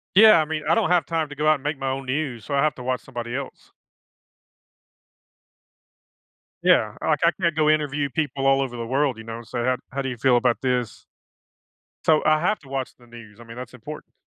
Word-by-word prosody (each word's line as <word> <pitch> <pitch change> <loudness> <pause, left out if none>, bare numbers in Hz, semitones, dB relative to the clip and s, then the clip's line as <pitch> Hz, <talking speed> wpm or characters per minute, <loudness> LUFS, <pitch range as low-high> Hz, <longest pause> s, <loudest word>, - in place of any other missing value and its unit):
Yeah, 215 -2 +8
I - - -1
mean, 155 0 -4
I 165 - +5
don't - - +1
have 180 -1 +3
time 160 -2 -2
to 145 - -9
go 150 +2 -1
out 155 - +6
and 135 - -11
make 150 0 -2
my 135 0 -2
own 135 +1 -3
news, 130 -4 -3
so 145 - -5
I 140 - +2
have 155 -3 +1
to 125 - -9
watch 130 0 -1
somebody 120 -2 -6
else. 135 -1 -7 2.9
Yeah, - - +4
like, - - +2
I - - +5
can't 170 -3 +1
go 155 -1 +3
interview 145 -2 +1
people 140 -1 -1
all 135 0 +4
over 130 -3 -3
the 115 -1 -4
world, 135 -1 +1
you 110 - -9
know, 115 0 -7
and 115 -1 -11
say, 125 - -4
"How 130 +1 +1
how 140 - -2
do 135 - -3
you 125 - -5
feel 125 +1 +4
about 120 -2 +2
this?" 125 -3 -2 1.0
So, 155 -1 +4
I 155 0 +4
have 210 +6 0
to 140 - -17
watch 135 -1 -4
the 120 - -20
news, 115 -3 -13
I - - -11
mean, 115 0 -11
that's 125 0 -8
important. 135 +5 -10
135 Hz, 230 wpm, -23 LUFS, 125-155 Hz, 2.9 s, Yeah